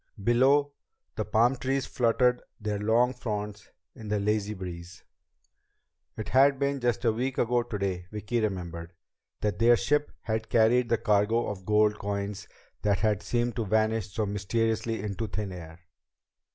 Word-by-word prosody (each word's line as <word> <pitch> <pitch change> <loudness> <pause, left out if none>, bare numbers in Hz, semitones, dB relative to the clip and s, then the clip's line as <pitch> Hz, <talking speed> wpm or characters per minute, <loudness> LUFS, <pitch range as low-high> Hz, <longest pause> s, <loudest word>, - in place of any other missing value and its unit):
Below, 135 +5 +4 0.4
the - - -1
palm 120 +4 +3
trees 135 +1 -1
fluttered 125 +1 +2 0.2
their 105 -2 -2
long 115 +4 +3
fronds 105 -4 -5 0.2
in 110 -4 -10
the 105 0 0
lazy 105 +1 0
breeze. 90 -2 -8 1.1
It 110 - -5
had 135 +2 +5
been 140 0 0
just 120 -1 0
a 115 - +5
week 125 +4 -2
ago 120 +1 +2
today, 100 -6 -3
Vicki 105 +3 -2
remembered, 85 -4 -4 0.5
that 105 -1 -1
their 120 +1 +6
ship 150 +3 0
had 110 -1 -3
carried 120 +2 +3
the 115 - +3
cargo 105 +3 +2
of 95 -3 -6
gold 105 0 +3
coins 100 0 -4 0.3
that 100 -1 +2
had 105 -2 +1
seemed 120 +1 -1
to 115 - 0
vanish 110 0 +1
so 110 +2 -1
mysteriously 110 +2 -1
into 105 +2 -3
thin 105 -1 -4
air. 85 -1 -10
110 Hz, 150 wpm, -28 LUFS, 100-120 Hz, 1.1 s, their